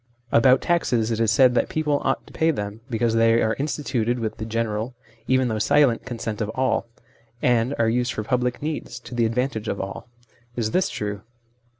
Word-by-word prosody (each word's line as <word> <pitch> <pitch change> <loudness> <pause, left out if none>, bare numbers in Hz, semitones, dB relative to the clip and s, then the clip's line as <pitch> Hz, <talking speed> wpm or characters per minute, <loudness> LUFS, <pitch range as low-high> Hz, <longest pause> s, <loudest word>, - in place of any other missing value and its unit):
About 130 +3 +5
taxes 120 -10 +1
it 115 - -1
is 115 -2 +2
said 125 +2 +5
that 120 - +1
people 150 -2 0
ought - - 0
to - - -16
pay 160 - +2
them 105 -6 -3
because 115 -1 0
they 115 0 +4
are 110 -1 +2
instituted 130 -5 -1
with 110 -2 -3
the 110 - -5
general, 115 +1 -2 0.3
even 130 -1 +3
though 110 -2 -1
silent, 135 -1 +3
consent 115 -3 -4
of 105 - -1
all; 130 -2 0 0.5
and 120 +2 +2
are 115 - +2
used 120 +2 +1
for 110 - -3
public 125 +3 -1
needs, 150 -5 -4
to 125 - -11
the 120 -1 +2
advantage 115 -1 -2
of - - -2
all. 95 +4 -6 0.5
Is 110 -3 -1
this 185 - +2
true 105 -1 -4
120 Hz, 195 wpm, -23 LUFS, 110-130 Hz, 0.5 s, About